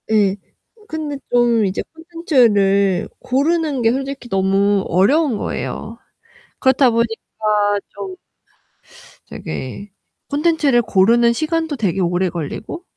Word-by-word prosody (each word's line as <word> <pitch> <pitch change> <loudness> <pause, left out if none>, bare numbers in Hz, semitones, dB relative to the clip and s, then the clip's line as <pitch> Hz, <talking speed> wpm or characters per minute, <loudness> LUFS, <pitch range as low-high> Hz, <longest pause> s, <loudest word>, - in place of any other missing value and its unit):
예, 205 -3 +3 0.5
근데 305 -2 -4
좀 240 -3 +3
이제 190 0 -2
콘텐츠를 225 - +2
고르는 295 +1 0
게 225 -1 +3
솔직히 270 -1 -4
너무 195 0 +2
어려운 240 - +2
거예요. - - -5 0.6
그렇다 260 0 +4
보니까 230 0 +2 0.9
좀 195 -2 -7 1.1
되게 130 - -7 0.4
콘텐츠를 290 -4 +2
고르는 235 +3 +3
시간도 320 +3 -1
되게 195 -7 -1
오래 180 +1 +1
걸리고 175 - -6
235 Hz, 235 characters per minute, -19 LUFS, 195-290 Hz, 1.1 s, 그렇다